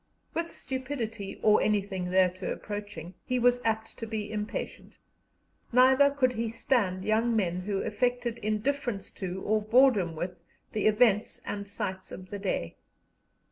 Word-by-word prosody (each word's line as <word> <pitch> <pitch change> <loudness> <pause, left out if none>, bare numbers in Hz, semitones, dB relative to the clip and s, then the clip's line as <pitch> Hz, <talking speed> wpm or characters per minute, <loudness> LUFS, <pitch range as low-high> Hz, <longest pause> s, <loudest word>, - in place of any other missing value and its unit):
With 335 0 -2
stupidity, 250 -8 -5
or 215 -1 +5
anything 195 -3 0
thereto 185 0 +2
approaching, 205 -5 -6
he 255 - -1
was 245 0 +3
apt 220 0 -2
to 225 - -4
be 215 -1 -4
impatient; 210 0 -5 0.7
neither 260 +3 +6
could 265 -3 +1
he 230 -1 -2
stand 205 -5 0
young 225 +2 +2
men 180 -5 +1
who 195 +1 -2
affected 245 +1 -1
indifference 215 +1 -2
to, 190 -1 -5
or 215 +1 +2
boredom 215 -6 +4
with, 180 +3 -4 0.3
the 215 -1 +1
events 215 -1 +3
and 200 -1 -4
sights 190 -1 -4
of 185 0 -9
the 205 - -4
day. 185 - -2
215 Hz, 140 wpm, -29 LUFS, 195-245 Hz, 0.7 s, neither